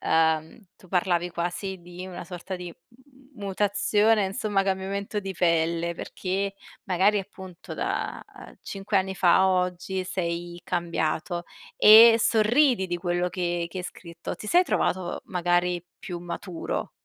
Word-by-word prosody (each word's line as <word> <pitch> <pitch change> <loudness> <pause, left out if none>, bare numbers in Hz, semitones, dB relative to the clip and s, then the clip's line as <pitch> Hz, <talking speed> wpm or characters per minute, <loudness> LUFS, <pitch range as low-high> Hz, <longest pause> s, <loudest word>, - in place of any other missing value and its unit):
uhm, 160 +2 +1 0.2
tu 185 - -19
parlavi 175 -1 +1
quasi 180 +3 -3
di 175 +1 -9
una 180 -1 -7
sorta 180 +2 -6
di, 180 0 -8 0.2
mhmm, 260 +2 -23
mutazione, 205 +2 +2
insomma, 195 -1 0
cambiamento 195 +2 -2
di 195 -1 -5
pelle. 170 0 +1
Perché 195 +3 -3 0.3
magari 195 +3 +3
appunto 190 -2 -10
da, - - -3
uhm, - - -13
5 195 +1 -3
anni 190 0 0
fa 180 -2 +4
a 190 0 +4
oggi, 180 +1 -1
sei 175 -1 -4
cambiato. 170 0 -2 0.3
E 225 +2 +9
sorridi 225 -1 +3
di 175 - -1
quello 175 0 -1
che 175 -1 -2
che 190 - -6
hai 180 - -5
scritto. 170 -2 -7
Ti 210 - -8
sei 360 +1 +5
trovato 185 - -1
magari, 175 -1 0
più 180 -5 -6
maturo? 175 0 -5
185 Hz, 140 wpm, -26 LUFS, 175-200 Hz, 0.3 s, E